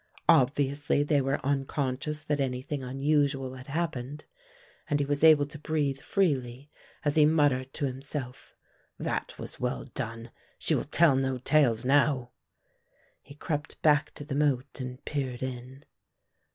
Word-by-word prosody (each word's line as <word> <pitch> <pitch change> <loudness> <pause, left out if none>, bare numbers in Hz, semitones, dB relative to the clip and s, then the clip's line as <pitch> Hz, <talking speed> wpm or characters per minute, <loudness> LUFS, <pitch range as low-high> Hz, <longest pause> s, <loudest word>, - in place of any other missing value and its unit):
Obviously 145 -1 +3
they 145 -1 +2
were 135 +1 0
unconscious 140 +1 -1
that 150 -1 -1
anything 135 +1 -2
unusual 135 0 0
had 130 0 -11
happened 145 -3 -3 0.6
and 145 - +1
he 145 - +1
was 145 +1 -1
able 155 -3 +7
to 150 +1 -11
breathe 145 -3 -1
freely 140 -6 -1 0.3
as 145 +1 +1
he 155 - +7
muttered 145 -4 +2
to 145 - -1
himself, 130 -1 -6 0.4
"That - - -3
was - - -6
well 125 +1 -2
done, 115 -3 -5 0.3
she - - 0
will - - 0
tell 165 -5 +4
no 135 -1 0
tales 125 -3 +2
now." 135 -2 +2 0.9
He 145 - -14
crept 150 +1 -4
back 150 -1 +4
to 145 - -8
the 145 - -5
moat 140 -2 0
and 125 0 -7
peered 130 -4 -3
in. 130 +2 -7
140 Hz, 145 wpm, -28 LUFS, 130-150 Hz, 0.9 s, able